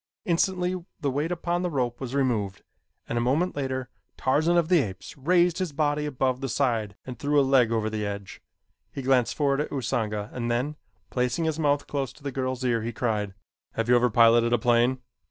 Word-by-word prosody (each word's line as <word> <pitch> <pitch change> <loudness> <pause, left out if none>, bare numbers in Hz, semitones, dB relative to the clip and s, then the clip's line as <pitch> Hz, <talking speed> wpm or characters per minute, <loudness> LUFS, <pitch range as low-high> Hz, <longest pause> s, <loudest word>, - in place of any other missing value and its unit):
Instantly 180 +1 0 0.2
the 140 - 0
weight 150 +6 -1
upon 175 0 -1
the 180 - -1
rope 125 -5 -2
was 130 0 -4
removed 110 -8 0 0.4
and 120 - -1
a - - 0
moment 145 +9 +1
later 130 -2 -3 0.3
Tarzan 155 +6 +2
of 170 -2 +3
the 180 -1 +5
Apes 95 -7 -7
raised 175 +4 +2
his 180 -5 -2
body 150 0 0
above 130 -2 -1
the 135 - -2
side 115 -6 0
and 125 -3 -8
threw 145 0 +2
a - - +5
leg 130 -4 +4
over 110 -1 0
the 110 -1 -2
edge. 100 -1 -6 0.5
He 135 - -6
glanced 125 -2 +2
forward 140 -1 +1
at - - -4
Usanga 110 -5 -2
and 120 -1 -3
then, 125 +6 -1 0.4
placing 125 +6 0
his 160 0 -1
mouth 145 -2 +2
close 140 -3 -3
to 150 - -19
the 140 - -3
girl's 130 -1 -2
ear 120 -2 +1
he 115 +2 -3
cried: 105 -4 -2 0.4
"Have 115 +1 -2
you 125 - +6
ever 120 +1 +4
piloted 115 +1 +5
a - - +5
plane?" 120 +2 +2
130 Hz, 205 wpm, -26 LUFS, 120-150 Hz, 0.5 s, you